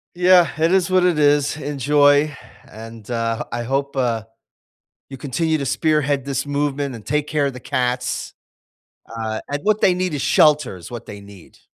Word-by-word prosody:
Yeah, 180 Hz, -1 st, +5 dB
it 165 Hz, +2 st, +3 dB
is 190 Hz, -1 st, +2 dB
what 185 Hz, -1 st, +4 dB
it 175 Hz, -4 st, +2 dB
is. 145 Hz, 0 st, +2 dB
Enjoy 145 Hz, 0 st, +2 dB, 0.3 s
and, 115 Hz, 0 st, -11 dB
uh, 115 Hz, 0 st, -2 dB
I 120 Hz, 0 st, -3 dB
hope, 140 Hz, +3 st, -2 dB
uh, 115 Hz, -4 st, 0 dB, 0.9 s
you 135 Hz, -, -8 dB
continue 155 Hz, +4 st, -1 dB
to 140 Hz, -, -3 dB
spearhead 145 Hz, -4 st, 0 dB
this 140 Hz, 0 st, -2 dB
movement 145 Hz, -1 st, -2 dB
and 105 Hz, -, -14 dB
take 150 Hz, 0 st, -1 dB
care 150 Hz, -2 st, 0 dB
of 140 Hz, -, -2 dB
the 125 Hz, -, -10 dB
cats. 125 Hz, 0 st, -2 dB, 0.8 s
Uh, 110 Hz, -1 st, -3 dB
and 145 Hz, 0 st, -2 dB
what 215 Hz, 0 st, +1 dB
they 185 Hz, -, +4 dB
need 180 Hz, -3 st, -2 dB
is 140 Hz, -, -3 dB
shelter 150 Hz, -9 st, +3 dB
is 85 Hz, -, -11 dB
what 120 Hz, -1 st, -8 dB
they 100 Hz, -1 st, -10 dB
need. 100 Hz, -3 st, -16 dB
140 Hz, 180 wpm, -20 LUFS, 120-150 Hz, 0.9 s, Yeah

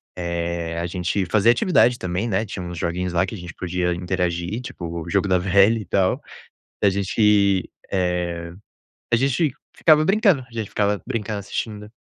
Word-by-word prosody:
eh, 85 Hz, -1 st, -3 dB
a 85 Hz, -, -2 dB
gente 90 Hz, +2 st, -1 dB
fazia 110 Hz, +5 st, +4 dB
atividade 120 Hz, -2 st, +3 dB
também, 90 Hz, +3 st, -2 dB
né? 105 Hz, +1 st, 0 dB
Tinha 100 Hz, -3 st, -6 dB
uns 85 Hz, -1 st, -6 dB
joguinhos 90 Hz, +2 st, -2 dB
lá, 85 Hz, +1 st, +2 dB
que 95 Hz, -, -6 dB
a -, -, -7 dB
gente 85 Hz, -1 st, -8 dB
podia 90 Hz, 0 st, -1 dB
interagir, 90 Hz, +3 st, -2 dB
tipo 85 Hz, -8 st, -6 dB
o 85 Hz, -, -9 dB
jogo 100 Hz, +1 st, +1 dB
da 95 Hz, -1 st, +3 dB
velha 100 Hz, +5 st, +4 dB
e 105 Hz, -, -6 dB
tal. 95 Hz, +1 st, +1 dB, 0.6 s
A 100 Hz, -, +6 dB
gente, 100 Hz, 0 st, +2 dB, 0.2 s
eh, 90 Hz, -2 st, -1 dB, 0.6 s
a 120 Hz, -, +5 dB
gente 135 Hz, +3 st, +1 dB, 0.2 s
ficava 155 Hz, -1 st, +5 dB
brincando, 195 Hz, -, +3 dB
a -, -, -25 dB
gente 110 Hz, -3 st, -3 dB
ficava 105 Hz, -1 st, 0 dB
brincando, 110 Hz, -4 st, -3 dB
assistindo 105 Hz, +1 st, -5 dB
95 Hz, 175 wpm, -22 LUFS, 90-110 Hz, 0.6 s, A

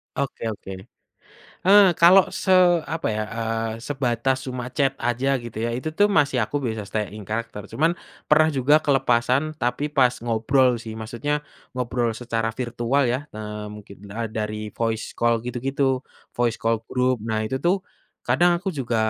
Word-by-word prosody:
Oke 140 Hz, -3 st, -3 dB
oke, 100 Hz, -1 st, -10 dB, 1.0 s
eee, 200 Hz, 0 st, +8 dB
kalau 180 Hz, +3 st, +7 dB
se 190 Hz, -, -1 dB, 0.4 s
apa 165 Hz, +1 st, -2 dB
ya, 110 Hz, 0 st, -1 dB
eee, 115 Hz, 0 st, -2 dB
sebatas 130 Hz, -2 st, 0 dB
cuma 125 Hz, 0 st, -5 dB
chat 135 Hz, +1 st, +1 dB
aja 130 Hz, +3 st, +1 dB
gitu 120 Hz, -2 st, -8 dB
ya -, -, -1 dB
itu 130 Hz, +6 st, -3 dB
tuh 205 Hz, +6 st, +3 dB
masih 145 Hz, -9 st, +2 dB
aku 145 Hz, +5 st, -3 dB
bisa 110 Hz, -3 st, -2 dB
stay 105 Hz, +1 st, -3 dB
in 105 Hz, -2 st, -10 dB
character 110 Hz, -1 st, -4 dB
cuman 160 Hz, +3 st, +2 dB, 0.4 s
pernah 155 Hz, +1 st, +6 dB
juga 145 Hz, +4 st, +5 dB
kelepasan 135 Hz, 0 st, +2 dB
tapi 125 Hz, +5 st, -1 dB
pas 130 Hz, -4 st, +4 dB
ngobrol 120 Hz, +3 st, +3 dB
sih, 110 Hz, -1 st, -7 dB
maksudnya 120 Hz, +7 st, -3 dB, 0.3 s
ngobrol 120 Hz, -2 st, -1 dB
secara 115 Hz, -1 st, -2 dB
virtual 125 Hz, +2 st, 0 dB
ya, 125 Hz, 0 st, +1 dB, 0.2 s
eee, 105 Hz, 0 st, -6 dB
mungkin 105 Hz, -1 st, -11 dB
da 110 Hz, +2 st, -4 dB
dari 105 Hz, -1 st, -4 dB
voice 115 Hz, -1 st, -2 dB
call 115 Hz, -1 st, +2 dB
gitu-gitu, 130 Hz, +2 st, -1 dB, 0.4 s
voice 120 Hz, -2 st, +1 dB
call 115 Hz, 0 st, 0 dB
group 125 Hz, -1 st, +1 dB
nah 110 Hz, -1 st, 0 dB
itu 110 Hz, +4 st, -2 dB
tuh, 180 Hz, +6 st, +1 dB, 0.4 s
kadang 175 Hz, 0 st, +3 dB
aku 190 Hz, +3 st, -3 dB
juga 130 Hz, -7 st, -3 dB
125 Hz, 160 wpm, -23 LUFS, 115-140 Hz, 1.0 s, eee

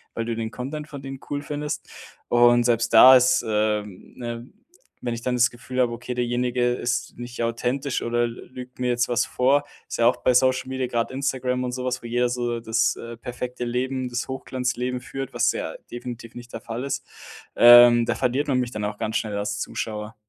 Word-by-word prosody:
weil 115 Hz, -, -2 dB
du 115 Hz, -1 st, -2 dB
den 110 Hz, -1 st, -4 dB
Content 150 Hz, +4 st, -6 dB
von 140 Hz, -2 st, -9 dB
denen 135 Hz, 0 st, -7 dB
cool 145 Hz, 0 st, -2 dB
findest. 150 Hz, 0 st, -4 dB, 0.4 s
Und 120 Hz, 0 st, +5 dB
selbst 115 Hz, -1 st, +1 dB
da 130 Hz, +4 st, +10 dB
ist, 130 Hz, +1 st, +3 dB
ähm, 105 Hz, -2 st, -2 dB
ne, 120 Hz, 0 st, -6 dB, 0.5 s
wenn 120 Hz, -1 st, -2 dB
ich 115 Hz, -, -5 dB
dann 125 Hz, 0 st, -1 dB
das 120 Hz, -1 st, +3 dB
Gefühl 125 Hz, +1 st, -3 dB
habe: 120 Hz, -1 st, +2 dB
„Okay, 125 Hz, +1 st, -5 dB
derjenige 120 Hz, 0 st, 0 dB
ist 125 Hz, 0 st, -2 dB
nicht 120 Hz, -1 st, -5 dB
authentisch 125 Hz, +3 st, -1 dB
oder 120 Hz, 0 st, 0 dB
l 120 Hz, 0 st, -5 dB
lügt 125 Hz, 0 st, -10 dB
mir 125 Hz, -, 0 dB
jetzt 120 Hz, 0 st, +1 dB
was 120 Hz, +1 st, +2 dB
vor.“ 140 Hz, +3 st, +2 dB, 0.2 s
Ist -, -, -4 dB
ja 115 Hz, -, +5 dB
auch 125 Hz, -, +4 dB
bei 125 Hz, -, +2 dB
Social 130 Hz, +1 st, +3 dB
Media, 130 Hz, -1 st, -2 dB
grad 120 Hz, 0 st, -1 dB
Instagram 130 Hz, -2 st, -1 dB
und 125 Hz, -, -4 dB
so 125 Hz, 0 st, -4 dB
was, 125 Hz, 0 st, -2 dB
wo 120 Hz, -, -8 dB
jeder 120 Hz, +1 st, +1 dB
so 120 Hz, -1 st, -2 dB
das, 115 Hz, 0 st, +1 dB
äh, 115 Hz, 0 st, -8 dB
perfekte 125 Hz, 0 st, -5 dB
Leben, 130 Hz, +1 st, -2 dB
das 120 Hz, 0 st, -3 dB
Hochglanzleben 125 Hz, -1 st, -3 dB
führt, 135 Hz, 0 st, -6 dB
was 120 Hz, -1 st, +2 dB
ja 80 Hz, -, -4 dB, 0.2 s
definitiv 120 Hz, -1 st, -7 dB
nicht 120 Hz, 0 st, -11 dB
der 115 Hz, -, -6 dB
Fall 115 Hz, +2 st, -5 dB
ist. 135 Hz, -2 st, -3 dB, 0.5 s
Ähm, 120 Hz, 0 st, +8 dB
da -, -, +1 dB
verliert 130 Hz, +3 st, 0 dB
man 130 Hz, -2 st, +2 dB
mich 125 Hz, -1 st, -2 dB
dann 105 Hz, -1 st, -3 dB
auch 105 Hz, 0 st, -4 dB
ganz 110 Hz, -, -1 dB
schnell 105 Hz, -2 st, -3 dB
als 105 Hz, 0 st, -3 dB
Zuschauer. 105 Hz, +1 st, -5 dB
120 Hz, 210 wpm, -24 LUFS, 115-125 Hz, 0.5 s, da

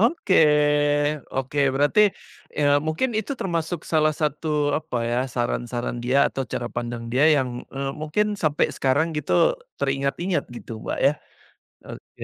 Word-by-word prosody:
Oke 230 Hz, -, +2 dB, 1.0 s
oke, 135 Hz, +2 st, -3 dB, 0.2 s
berarti, 145 Hz, +9 st, +3 dB, 0.6 s
eee, 145 Hz, -1 st, +4 dB
mungkin 170 Hz, +12 st, 0 dB
itu 280 Hz, -, -3 dB
termasuk 170 Hz, -1 st, -2 dB
salah 155 Hz, -1 st, +3 dB
satu 150 Hz, +1 st, -1 dB, 0.3 s
apa 155 Hz, -5 st, -6 dB
ya, 120 Hz, -, +1 dB, 0.2 s
saran-saran 120 Hz, 0 st, -2 dB
dia 130 Hz, +3 st, +2 dB
atau 135 Hz, -, -3 dB
cara 120 Hz, -1 st, -2 dB
pandang 120 Hz, 0 st, -4 dB
dia 135 Hz, +4 st, +3 dB
yang, 130 Hz, -3 st, 0 dB, 0.3 s
eee, 135 Hz, 0 st, -2 dB
mungkin 155 Hz, +8 st, 0 dB, 0.2 s
sampe 150 Hz, -1 st, +2 dB
sekarang 140 Hz, +4 st, +2 dB
gitu 145 Hz, -11 st, -2 dB, 0.5 s
teringat-ingat 140 Hz, +6 st, -1 dB
gitu, -, -, -9 dB
Mbak, -, -, -3 dB
ya. 145 Hz, -, +5 dB, 0.7 s
Oke. -, -, -11 dB
145 Hz, 135 wpm, -23 LUFS, 130-160 Hz, 1.0 s, ya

